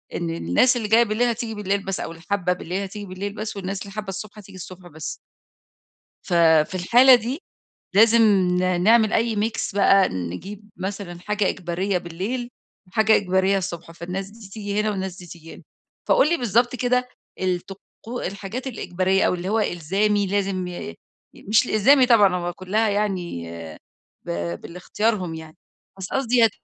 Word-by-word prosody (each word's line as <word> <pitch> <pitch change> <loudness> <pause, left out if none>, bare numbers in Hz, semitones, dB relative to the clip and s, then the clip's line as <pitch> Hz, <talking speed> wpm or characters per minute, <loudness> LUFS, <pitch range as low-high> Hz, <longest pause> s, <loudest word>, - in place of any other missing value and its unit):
إن 85 - -2
الناس 85 - +2
اللي 220 -3 -3
جاية 230 +2 +5
بالليل 225 +2 0
هتيجي 230 -1 -3
بالليل 200 -1 -2
بس 195 -1 -3
أو - - -5
اللي 165 0 -12
حابّة 180 -3 +1
بالليل 180 +2 -4
هتيجي 205 +1 -7
بالليل 195 +2 -5
بس 215 -1 -5
والناس 195 0 -4
اللي 200 - -8
حابّة 210 -2 -5
الصبح 205 +3 -7
هتيجي 200 -1 -13
الصبح 180 0 -10
بس. 155 -2 -6 1.1
ف - - -8 0.3
في - - -11
الحالة 240 +9 +6
دي 245 - -1 0.5
لازم 225 +3 +6
ن 185 -3 +2
نعمل 220 +1 +5
أي 230 -1 +1
mix 210 -1 -2
بقى، 195 -1 +5
نجيب 190 - -6
مثلًا 190 -2 -5
حاجة 210 0 0
إجبارية 180 +1 -1
بالليل 195 +9 -4 0.4
وحاجة 220 +3 +4
إجبارية 190 0 +2
الصبح، 175 -3 -6
فالناس 180 +3 -6
دي 215 -2 -13
تيجي 205 0 -3
هنا 215 0 0
والناس 190 -2 -4
دي 180 - -11
تيجي 165 -1 -11
هنا، - - -14 0.5
فقُل 285 - +5
لي 340 - +3
بالضبط 240 - +1
كده 250 +1 +1 0.3
الطقو 190 +6 -5
الحاجات 200 +7 -6
الإجبارية 190 -6 0
أو - - +1
اللي 180 +2 -4
هو 220 - +1
إلزامي 200 +3 0
لازم 195 -2 -1
ي 175 - -6 0.4
ي - - -15
مش 220 +3 +4
الإلزامي 255 +5 +5
طبعًا 205 -6 +5
هو 175 0 -3
كلّها 200 +4 0
يعني 185 - -2 0.8
ب - - -9 0.3
بالإختيارهم 180 0 -2
يعني، 160 -1 -11 0.4
بس 190 -1 -5
قصدي 250 -3 +2
هي 225 - +6
200 Hz, 165 wpm, -23 LUFS, 180-220 Hz, 1.1 s, الحالة